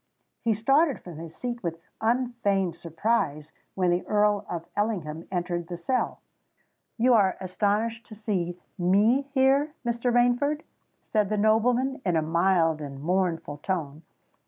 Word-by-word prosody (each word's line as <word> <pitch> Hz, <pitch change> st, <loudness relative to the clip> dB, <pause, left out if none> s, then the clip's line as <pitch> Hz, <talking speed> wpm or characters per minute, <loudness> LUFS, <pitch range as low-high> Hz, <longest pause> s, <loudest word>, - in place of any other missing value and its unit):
He 230 Hz, -, +2 dB
started 270 Hz, -, +3 dB
from 170 Hz, -4 st, -10 dB
his 165 Hz, -1 st, -9 dB
seat 240 Hz, -1 st, -4 dB
with 170 Hz, -2 st, -3 dB, 0.2 s
unfeigned 225 Hz, -6 st, +1 dB
surprise, 165 Hz, -3 st, -1 dB, 0.2 s
when 180 Hz, -2 st, +2 dB
the 175 Hz, +1 st, +1 dB
Earl 210 Hz, -1 st, +2 dB
of 170 Hz, -1 st, -4 dB
Ellingham 170 Hz, -7 st, -2 dB
entered 175 Hz, -2 st, -2 dB
the 175 Hz, -1 st, -5 dB
cell. 250 Hz, +9 st, -1 dB, 0.8 s
"You 245 Hz, +2 st, +4 dB
are 200 Hz, -5 st, +4 dB
astonished 210 Hz, +5 st, -1 dB
to 215 Hz, -, -10 dB
see 185 Hz, -5 st, -2 dB, 0.2 s
me 210 Hz, +10 st, +3 dB
here, 275 Hz, +3 st, +3 dB
Mr. 235 Hz, +1 st, 0 dB
Rainford?" 245 Hz, +5 st, +2 dB, 0.4 s
said 210 Hz, -3 st, 0 dB
the 215 Hz, -, 0 dB
nobleman, 240 Hz, +5 st, +2 dB
in 180 Hz, -3 st, +1 dB
a 160 Hz, -, +2 dB
mild 165 Hz, -1 st, +2 dB
and 140 Hz, -2 st, -7 dB
mournful 170 Hz, -2 st, -1 dB
tone. 155 Hz, -3 st, -3 dB
200 Hz, 140 wpm, -27 LUFS, 170-235 Hz, 0.8 s, You